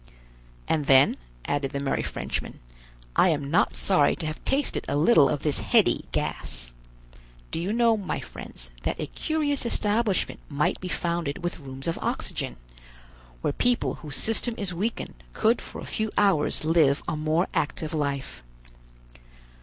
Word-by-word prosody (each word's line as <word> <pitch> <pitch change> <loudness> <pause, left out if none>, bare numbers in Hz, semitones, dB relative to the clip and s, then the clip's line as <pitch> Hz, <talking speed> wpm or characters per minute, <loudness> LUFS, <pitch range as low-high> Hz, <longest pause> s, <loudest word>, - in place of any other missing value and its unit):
"And 150 -3 0
then," 135 +1 +6 0.3
added 145 -1 0
the 140 - -1
merry 140 -1 0
Frenchman, - - -4 0.6
"I 185 - +5
am 145 -3 -1
not 170 - +3
sorry 190 -2 +3
to 165 - -5
have 155 0 -5
tasted 275 +2 +1
a 145 - 0
little 150 -2 +6
of 145 -2 -2
this 150 -2 +2
heady - - +3
gas. - - -3 0.8
Do - - -2
you 180 +4 -1
know, 230 0 +4
my 195 -6 -3
friends, - - -9
that - - -2
a - - -1
curious 300 -3 -1
establishment 215 -3 0
might 150 0 0
be 185 - -4
founded 170 -4 -2
with 175 - -2
rooms 135 -2 -8
of 165 - -1
oxygen, - - -2 0.9
where - - 0
people 245 +6 +1
whose 150 -4 -5
system 225 +1 0
is 195 -3 -3
weakened 180 - -3
could 230 +2 +2
for - - -8
a - - -7
few 220 0 0
hours 190 -7 +3
live 155 -3 +4
a - - -1
more 155 +3 +1
active 155 +2 -1
life. 140 - -2
165 Hz, 155 wpm, -26 LUFS, 140-210 Hz, 0.9 s, then